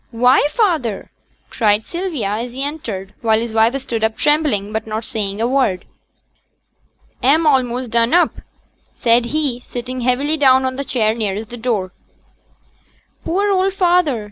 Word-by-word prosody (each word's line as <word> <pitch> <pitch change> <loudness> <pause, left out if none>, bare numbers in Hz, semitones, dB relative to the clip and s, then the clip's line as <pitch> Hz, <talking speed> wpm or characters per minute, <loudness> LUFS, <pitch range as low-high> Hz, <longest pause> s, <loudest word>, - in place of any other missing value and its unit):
'Why, 250 +4 +3
feyther!' 310 - -1 0.4
cried 215 -1 +1
Sylvia 335 - -3
as 235 +4 -3
he 265 +2 -4
entered; 225 -10 -5
while 220 -2 +2
his 230 -1 -4
wife 225 +4 +2
stood 235 -4 -4
up 220 0 0
trembling, 295 -10 +1
but 220 0 -3
not 220 +1 -4
saying 210 -5 -4
a 230 - +1
word. 250 -9 0 1.4
'A'm 305 +6 +3
a'most 255 -4 +1
done 235 +1 +2
up,' 350 0 +2 0.5
said 235 0 +2
he, 275 -1 -1
sitting 250 +1 -6
heavily 270 +6 0
down 265 -2 +4
on 260 0 -2
the 280 - -3
chair 220 -5 0
nearest 215 -1 -3
the 240 - -7
door. 220 -6 -2 1.3
'Poor 400 +4 0
old 380 0 +1
feyther!' 350 - +2
245 Hz, 150 wpm, -18 LUFS, 220-290 Hz, 1.4 s, down